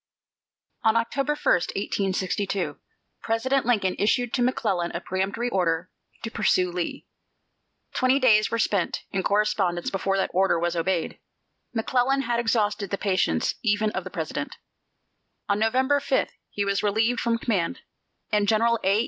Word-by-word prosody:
On 220 -1 +4
October 275 +5 0
1, 300 - -15 0.4
1862, 195 -1 -1 0.4
President 250 +3 0
Lincoln 205 -6 +2
issued 230 +3 +1
to 250 - +1
McClellan 205 -8 0
a - - -1
peremptory 190 +6 -2
order 175 -3 0 0.3
to 225 - -4
pursue 185 -5 +2
Lee. 175 -1 -4 0.9
Twenty 255 +1 +3
days 220 -6 +4
were 230 - -1
spent 200 -5 0
in 195 - 0
correspondence 200 -3 +1
before 195 0 0
that 190 - 0
order 190 -1 +3
was 170 0 -1
obeyed. 170 0 -1 0.6
McClellan 255 +4 +1
had 235 -1 0
exhausted 210 -4 0
the 200 - -2
patience 185 - +1
even 215 -1 +1
of - - -3
the - - -7
President. - - -4 0.9
On 200 0 +1
November 260 +6 +2
5 275 -1 0 0.2
he 205 - -2
was 200 0 0
relieved 220 +3 +1
from 235 -1 +1
command, 220 -1 -1 0.5
and 210 -1 +2
General 230 +2 +3
A. 195 +2 +3
210 Hz, 145 wpm, -25 LUFS, 190-235 Hz, 0.9 s, On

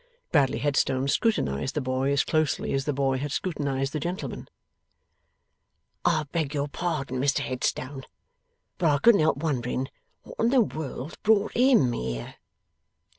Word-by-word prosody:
Bradley 140 -5 +3
Headstone 135 -2 +1
scrutinized 135 - 0
the - - +1
boy 130 0 0
as 140 0 +3
closely 155 -2 0
as 135 0 0
the 150 - +1
boy 135 -1 0
had 145 +1 -3
scrutinized 140 -5 -2
the 155 - -1
gentleman. 175 +6 -5 1.6
'I 165 -3 +3
beg 155 -4 -1
your 140 0 0
pardon, 145 -5 -3
Mr 140 +2 +2
Headstone, 130 +1 -3 0.7
but 170 -3 +3
I 145 - +3
couldn't 225 +3 +5
help 155 -2 +2
wondering 135 -3 -2 0.3
what - - -13
in 230 - +3
the 260 0 +5
world 155 - -4
brought 210 -1 +3
HIM 245 - +4
here! 60 - -4
140 Hz, 145 wpm, -26 LUFS, 135-165 Hz, 1.6 s, couldn't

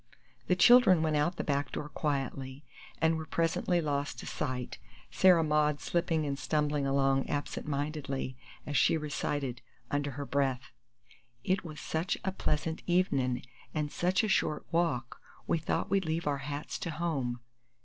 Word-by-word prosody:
The 180 - +3
children 195 -4 +7
went 155 -1 +1
out 150 +4 +1
the - - -3
back 140 -1 -1
door 150 - -4
quietly, 140 -1 -3 0.3
and 160 0 +3
were 160 - -5
presently 170 +2 +1
lost 145 -2 -2
to - - -7
sight, 130 -4 -4 0.3
Sarah 165 +7 +5
Maud 150 -1 +2
slipping 165 -2 0
and 140 -1 -2
stumbling 150 -2 0
along 135 0 +2
absent 145 0 -3
mindedly 140 -2 -3 0.3
as 145 - -4
she 150 - +4
recited, 145 -4 -3 0.3
under 145 0 0
her 140 - -3
breath, 135 -3 -1 0.7
"It 185 +1 +1
was 155 -3 -8
such 160 +3 -1
a 190 - +1
pleasant 160 -3 -1
evenin' 140 -9 +1 0.3
an 150 -1 0
sech 180 +7 +1
a - - +1
short 155 -6 +1
walk 165 -8 0 0.2
we 165 - +1
thought 160 - -2
we'd 195 -2 +2
leave 160 +1 -1
our 145 -2 0
hats 145 +2 -5
to 170 - -3
home." 150 -7 -2
150 Hz, 160 wpm, -31 LUFS, 140-165 Hz, 0.7 s, children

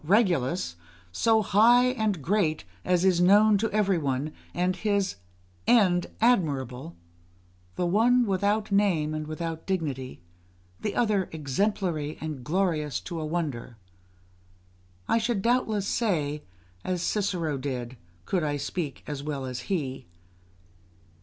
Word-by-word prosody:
Regulus, 175 - +1 0.3
so 220 - +3
great 240 +6 +5
and 210 - -1
high 170 -4 +2 0.3
as 180 0 +2
is 180 -2 +3
known 205 +3 +6
to 225 +2 0
every 200 -4 +1
one, 140 +1 -2 0.2
and 180 +1 0
his 200 - 0 0.5
end 185 -7 +4
admirable; 135 - +1 0.8
the 180 - -1
one 235 +7 +4
without 205 +2 0
name 180 -7 +2
and 155 0 -4
without 160 +1 -5
dignity, 145 -9 -3 0.6
the 210 - -3
other 210 -5 +1
exemplary 160 0 -1
and 150 -5 -5
glorious 155 -3 0
to 170 -2 -6
a - - -3
wonder. 145 -8 -3 1.3
I 230 - +3
should 225 -3 -1
doubtless 230 -4 +1
say, 150 - -1 0.4
as 180 -2 -2
Cicero 175 -8 -1
did, 130 -2 -4 0.3
could 180 -4 0
I 145 -1 -1
speak 145 0 -4
as 145 -2 -5
well 140 -2 -4
as 130 -1 -4
he. 135 - -2
175 Hz, 125 wpm, -27 LUFS, 150-205 Hz, 1.3 s, known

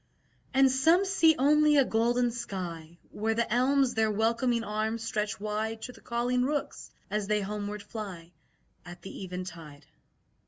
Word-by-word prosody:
And 270 0 +4
some 325 +9 +4
see 330 -5 +4
only 300 +2 +4
a 275 - +5
golden 240 +2 +1
sky 175 -8 -6
Where 220 +1 -1
the 235 -1 0
elms 260 +1 +3
their 220 -2 +2
welcoming 230 +3 +1
arms 220 +1 -2
stretch 210 -3 -2
wide 215 +2 -3
To 250 - -5
the - - -17
calling 245 +1 0
rooks, 290 +3 -2 0.2
as 210 -1 -1
they 210 0 +1
homeward 205 +1 -4
fly 195 -6 -8 0.5
At 175 0 -11
the 195 - -8
eventide. 170 -6 -8
225 Hz, 150 wpm, -29 LUFS, 205-250 Hz, 0.5 s, a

